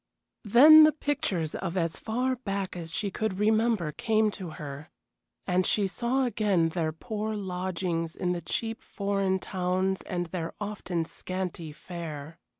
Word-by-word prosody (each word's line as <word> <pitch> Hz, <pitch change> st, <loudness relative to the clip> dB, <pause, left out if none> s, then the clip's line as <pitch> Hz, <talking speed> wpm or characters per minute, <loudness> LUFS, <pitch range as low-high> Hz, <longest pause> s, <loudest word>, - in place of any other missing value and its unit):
Then 300 Hz, +9 st, +9 dB
the 310 Hz, 0 st, +6 dB
pictures 285 Hz, -, -1 dB
of 180 Hz, 0 st, -3 dB
as 165 Hz, -2 st, 0 dB
far 250 Hz, +4 st, -1 dB
back 200 Hz, -6 st, -3 dB
as 165 Hz, -2 st, -6 dB
she 205 Hz, -2 st, -1 dB
could 215 Hz, -1 st, -2 dB
remember 215 Hz, -5 st, +2 dB
came 215 Hz, +5 st, +1 dB
to 185 Hz, -3 st, -7 dB
her, 145 Hz, 0 st, -7 dB, 0.6 s
and 180 Hz, +1 st, +2 dB
she 205 Hz, +2 st, +2 dB
saw 245 Hz, +7 st, 0 dB
again 200 Hz, -8 st, +2 dB
their 160 Hz, -1 st, -1 dB
poor 215 Hz, +6 st, -4 dB
lodgings 180 Hz, -3 st, -2 dB
in 180 Hz, -, -1 dB
the 175 Hz, -1 st, -2 dB
cheap 225 Hz, +4 st, -3 dB
foreign 195 Hz, -1 st, -1 dB
towns 185 Hz, 0 st, -1 dB
and 175 Hz, -1 st, -3 dB
their 165 Hz, -1 st, -5 dB
often 190 Hz, -5 st, -3 dB
scanty 180 Hz, -2 st, -5 dB
fare. 160 Hz, -1 st, -8 dB
190 Hz, 150 wpm, -28 LUFS, 170-215 Hz, 0.6 s, Then